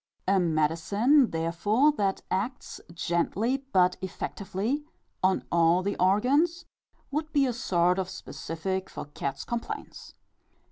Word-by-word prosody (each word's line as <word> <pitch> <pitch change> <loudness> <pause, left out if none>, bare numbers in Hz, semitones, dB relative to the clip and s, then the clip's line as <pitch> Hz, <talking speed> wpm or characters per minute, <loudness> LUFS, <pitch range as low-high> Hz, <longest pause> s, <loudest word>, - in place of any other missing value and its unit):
A 195 0 +4
medicine, 180 - +3
therefore, 170 - +2
that 200 -9 -1
acts, 230 +7 -3
gently 210 +11 -1
but 180 -1 +4
effectively, 200 +7 -3 0.4
on 185 0 +2
all 170 +2 +4
the 200 +1 -1
organs 275 - +2 0.5
would 305 +2 -2
be 285 -3 +3
a 250 - 0
sort 180 -6 +1
of 185 -1 -2
specific 190 +4 -4
for - - -7
cats' 140 -2 -5
complaints. 235 -1 -6
195 Hz, 120 wpm, -28 LUFS, 175-250 Hz, 0.5 s, A